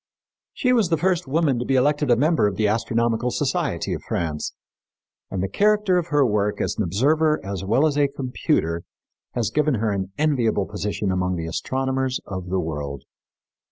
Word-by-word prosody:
She 250 -2 +2
was 225 -8 +3
the 165 - +2
first 180 -1 0
woman 145 -3 +1
to 120 - -3
be 135 - +1
elected 145 +2 +2
a 120 - +6
member 150 -1 +3
of 100 - -2
the 105 +2 +1
Astronomical 115 +2 0
Society - - -1
of - - -4
France, 80 -3 -2 0.8
and 95 -1 -2
the - - 0
character 210 - +3
of 170 - -4
her 145 -4 +3
work 105 -2 0
as - - -1
an - - 0
observer 150 - +2
as 95 -1 -4
well 115 +10 +3
as 145 -2 +1
a 145 - +4
computer 130 - -1 0.5
has 115 -3 0
given 150 -2 +2
her 110 -1 0
an 95 -1 -3
enviable 125 -10 +1
position 105 0 -2
among 90 0 0
the 85 -1 -4
astronomers 130 +8 -1
of 95 -2 -6
the 95 +1 0
world. 75 -5 -4
120 Hz, 185 wpm, -23 LUFS, 95-150 Hz, 0.8 s, a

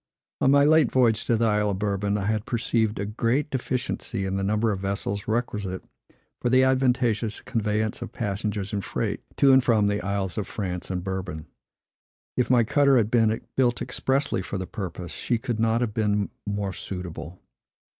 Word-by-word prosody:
On - - +3
my 140 +1 +6
late 155 -3 +5
voyage 115 -4 +3
to 115 - +2
the 115 - +2
Isle 105 -1 +2
of 100 - -1
Bourbon, 100 0 0
I 100 - -2
had 110 0 -1
perceived 115 -2 0
a 100 - -2
great 120 +7 0
deficiency 125 -5 -2
in 95 0 -2
the 95 - -1
number 105 +3 +1
of 100 - -2
vessels 100 +1 -3
requisite 105 -5 -2 0.6
for 120 - +1
the 130 +1 +5
advantageous 125 -4 +1
conveyance 110 -2 -1
of - - -6
passengers 105 -2 -3
and 100 -2 -1
freight - - -2 0.2
to 135 -1 +6
and 130 -1 +6
from 110 -4 +3
the 100 +1 +1
Isles 100 -1 -2
of 105 - -3
France 90 -4 -4
and 90 -2 -2
Bourbon. 95 -4 -4 0.9
If 125 - +1
my 125 -2 +5
cutter 140 +3 +4
had 110 -2 +1
been 115 -2 +3
built 125 -2 +2
expressly 135 -2 0
for 100 - -4
the 95 - -3
purpose, 90 -4 -6
she 120 - -1
could 115 0 -3
not 115 +1 +2
have 115 -4 -1
been 105 -2 0 0.2
more 100 -1 -2
suitable. 90 -3 -7
105 Hz, 185 wpm, -25 LUFS, 100-120 Hz, 0.9 s, my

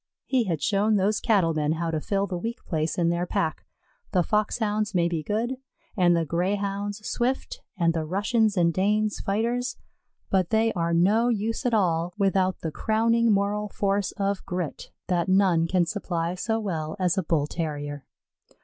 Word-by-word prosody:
He 255 -3 +1
had 165 -6 -2
shown 210 +1 +2
those 205 +2 +2
Cattle 195 -8 +2
men 155 0 0
how 165 0 -2
to 155 -1 -2
fill 200 +3 0
the 180 -3 -4
weak 230 +5 -5
place 160 -2 -1
in 170 -1 +2
their 170 +1 -1
pack; 160 -2 -2 0.5
the 180 -2 +3
Foxhounds 210 +1 0
may 170 -1 +3
be 170 -2 -2
good 225 - -2 0.4
and 175 -4 +4
the 165 - 0
Greyhounds 200 +4 -2
swift 250 +2 -2 0.2
and 170 -1 +2
the 165 -1 -1
Russians 205 +5 +1
and 170 -1 +3
Danes 210 +3 +1
fighters, 240 +5 -1 0.5
but 185 -3 +2
they 225 0 +2
are 170 -2 -1
no 205 +8 +3
use 225 +3 -1
at 235 - +2
all 175 -3 +1
without 190 -2 +1
the 160 - -3
crowning 230 +4 +2
moral 205 +1 0
force 200 0 0
of 200 -1 -2
grit, 180 -5 -4 0.2
that 175 -1 0
none 185 -4 +3
can 180 0 +2
supply 170 -3 -2
so 220 +5 -1
well 160 -7 -3
as 180 -1 +2
a 190 - +1
Bull 160 -4 +1
terrier. 145 -3 -4
195 Hz, 175 wpm, -26 LUFS, 170-215 Hz, 0.5 s, and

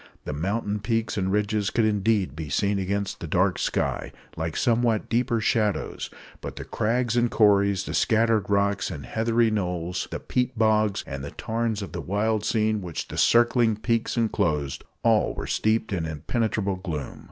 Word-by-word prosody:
The - - -3
mountain 100 +7 -1
peaks 115 +1 -1
and 95 -2 0
ridges 105 0 +1
could 115 - +1
indeed 105 -6 +1
be 80 -1 -6
seen 100 +6 +1
against 100 +1 -2
the - - -6
dark - - +1
sky, - - -1 0.2
like 80 0 -3
somewhat 115 -2 +1
deeper 120 0 +1
shadows; 105 -1 0 0.3
but - - -6
the - - -6
crags 120 +1 0
and 120 0 +3
corries, 100 -3 +3
the - - -5
scattered 110 -2 +2
rocks 100 0 +1
and 75 -8 -7
heathery 115 - +1
knolls, 90 -4 -2
the - - -4
peat 125 -1 -1
bogs 110 -2 +2
and 70 -1 -6
the 70 - -5
tarns 110 +1 -2
of 95 - -7
the 85 - -4
wild 105 +5 0
scene 110 -1 +1
which 85 -4 -5
these - - 0
circling 120 -1 +4
peaks 115 +2 -1
enclosed 75 -11 0 0.2
all - - +3
were - - -4
steeped 110 0 0
in 85 -4 -1
impenetrable 100 - -1
gloom. 80 -8 -5
105 Hz, 170 wpm, -25 LUFS, 95-115 Hz, 0.3 s, circling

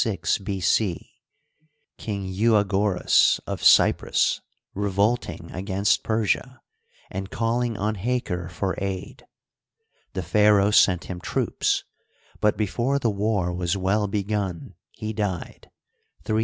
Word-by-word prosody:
King 100 -3 -4
Euagoras 100 -1 +3
of - - -5
Cyprus - - +4 0.3
revolting 100 +4 -1
against 95 +3 0
Persia, 115 +4 -1 0.5
and 95 0 -5
calling 115 0 -1
on 105 +2 -1
Haker 100 -5 -2
for 95 +2 -2
aid. 95 -1 -5 0.9
The 95 - -3
pharaoh 105 +2 +4
sent 90 -4 +4
him 90 -2 -7
troops, - - 0 0.6
but 105 - +2
before 120 +6 0
the 120 -5 0
war 100 -3 0
was 90 +2 -1
well 100 +2 +1
begun 100 -3 -3 0.2
he 110 0 -6
died 100 -5 -4 0.5
(386 - - -36
B. 110 - -1
100 Hz, 105 wpm, -24 LUFS, 95-110 Hz, 0.9 s, Cyprus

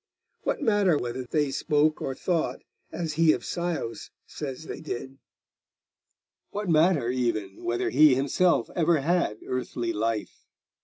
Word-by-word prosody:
What - - -2
matter 205 - +3
whether 125 0 -4
they 145 +2 0
spoke 150 +1 +1
or 135 - -3
thought 170 +1 -1 0.3
as 165 -3 -3
he 160 0 +5
of - - -4
Scios 170 -11 -3 0.2
says 140 -1 -6
they - - -7
did? 135 -2 -6 1.3
What 205 0 -4
matter, 155 -6 +3
even, 115 -6 -2
whether 120 0 -1
he 145 0 +6
himself 145 +7 +2
ever 165 -3 +3
had 170 -8 +1
earthly 120 -2 -2
life? 110 0 -3
145 Hz, 135 wpm, -27 LUFS, 120-170 Hz, 1.3 s, he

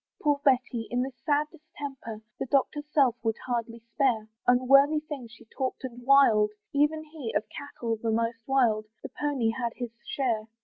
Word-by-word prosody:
Poor 290 -2 +1
Betty! 250 -4 +2
in 245 +1 0
this 260 -2 -8
sad 295 0 +2
distemper, 275 -7 -8 0.2
The - - -2
doctor's 295 +3 0
self 270 -6 +4
would 225 -1 0
hardly 235 -2 -3
spare, 235 -7 +1 0.2
Unworthy 275 +5 +5
things 280 -7 -8
she 235 +1 -16
talked 260 0 -3
and 245 -1 -7
wild, 245 -5 +5 0.2
Even 300 +2 +2
he, 300 -7 -6
of 205 - +2
cattle 235 -5 -4
the 230 - -1
most 230 +1 0
mild, 235 -6 +2 0.2
The - - -6
pony 275 -6 0
had 235 0 -3
his 245 -2 -5
share. 230 -6 -1
255 Hz, 170 wpm, -28 LUFS, 230-285 Hz, 0.2 s, Unworthy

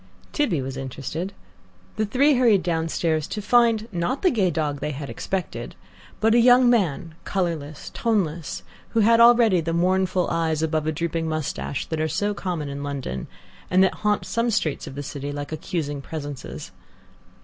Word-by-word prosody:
Tibby 185 - +1
was 135 0 -5
interested. 140 +7 -4 0.6
The 215 - 0
three 280 +7 +4
hurried 235 -7 +4
downstairs, 160 -2 0
to - - -4
find, 230 0 +3
not 180 +9 -2
the 365 - +5
gay 195 -6 +2
dog 150 -3 -1
they - - -2
expected, 145 -2 -4 0.4
but 220 +1 +3
a 240 - +6
young 245 +1 +6
man, 175 - 0
colourless, 160 -6 -3
toneless, 165 - -1 0.3
who 225 - +3
had 230 +2 +5
already 235 -6 +6
the 165 +1 -2
mournful 185 +1 +2
eyes 160 -2 0
above 155 -1 0
a - - +2
drooping 165 +1 -2
moustache 155 -2 -3
that 160 -1 -3
are 155 - +1
so 205 +6 -1
common 175 -7 -3
in 140 0 -5
London, 135 - -4 0.4
and 185 +1 +5
that 190 - +3
haunt 210 -1 +1
some 230 +1 0
streets 195 -10 -1
of 135 - -8
the 145 - -4
city 140 0 -5
like 145 +1 -5
accusing 150 -2 -3
presences. 145 -2 -7
170 Hz, 165 wpm, -24 LUFS, 150-210 Hz, 0.6 s, a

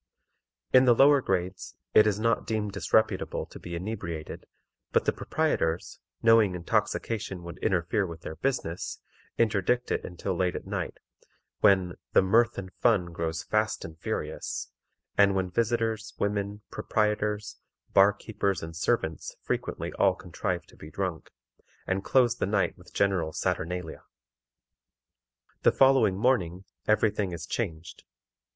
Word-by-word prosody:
In 130 0 +7
the 120 -2 +6
lower 140 +2 +6
grades 95 -3 -2 0.2
it 110 0 +7
is 105 -1 +1
not 115 0 +1
deemed 110 -2 -1
disreputable 105 +2 +1
to - - -12
be 85 -1 -6
inebriated, 85 -4 -5 0.4
but - - +2
the - - +2
proprietors, 90 - -1 0.2
knowing 115 -5 +5
intoxication 105 0 -1
would 85 +1 -9
interfere 95 0 +1
with 85 -1 -9
their 80 - -6
business, 90 -4 -2 0.4
interdict 115 +2 +1
it - - 0
until 90 +1 -4
late 90 0 0
at - - -5
night, - - -4 0.6
when 95 -3 +3 0.2
"the - - +6
mirth 115 +5 +3
and 95 -2 -6
fun 95 -8 +2
grows 85 0 -3
fast 110 0 0
and 80 0 -10
furious," - - -4 0.5
and 100 -1 +6
when 95 -1 -1
visitors, 115 0 -1
women, 100 0 -2
proprietors, 105 0 -1 0.4
bar 100 +1 +7
keepers, 100 -4 -2
and 80 0 -7
servants 80 -3 -1
frequently - - -3
all - - +4
contrive - - -4
to - - -19
be 75 - -11
drunk, 90 0 -4 0.6
and 95 +1 -1
close 120 -1 +3
the - - -1
night 100 -1 +1
with - - -18
a - - -16
general 95 -5 +1
saturnalia. 90 0 -3 1.6
The - - +5
following 135 -8 +4
morning, 95 -6 +1 0.2
every 110 0 +4
thing 100 -3 -2
is 85 -1 -5
changed. 85 -5 -4
100 Hz, 140 wpm, -28 LUFS, 90-110 Hz, 1.6 s, In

